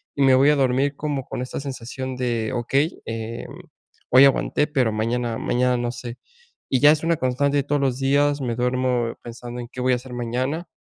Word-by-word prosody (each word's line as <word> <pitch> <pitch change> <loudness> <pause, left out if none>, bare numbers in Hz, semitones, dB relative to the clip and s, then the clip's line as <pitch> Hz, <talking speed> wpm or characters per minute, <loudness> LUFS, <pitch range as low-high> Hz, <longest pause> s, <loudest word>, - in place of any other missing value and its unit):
y 140 - -2
me 135 -1 +6
voy 140 +3 +5
a 150 - +4
dormir 135 +1 +1
como 145 -3 -3
con - - -5
esta 130 - -5
sensación 130 -1 -6
de: 120 -3 -1
"Okey, 135 +6 0
eh, 115 +1 -5
mm, - - -11 0.5
hoy 130 +2 +8
aguanté, 140 +2 +2
pero 130 -7 +1
mañana 115 +1 -1
mañana 125 0 +1
no 120 0 -2
sé". 120 0 -8 0.5
Y 130 - +1
ya 145 +1 +8
es 155 - +1
una 165 0 +2
constante 135 +3 0
de 140 - +2
todos 145 0 0
los 130 -2 0
días, 145 +1 +2
me 120 -3 -2
duermo 125 -1 0
pensando 120 +1 -7
en 120 - -9
qué 125 - -9
voy 130 0 +2
a - - +4
hacer 125 0 -8
mañana 130 +8 -2
130 Hz, 210 wpm, -23 LUFS, 120-140 Hz, 0.5 s, hoy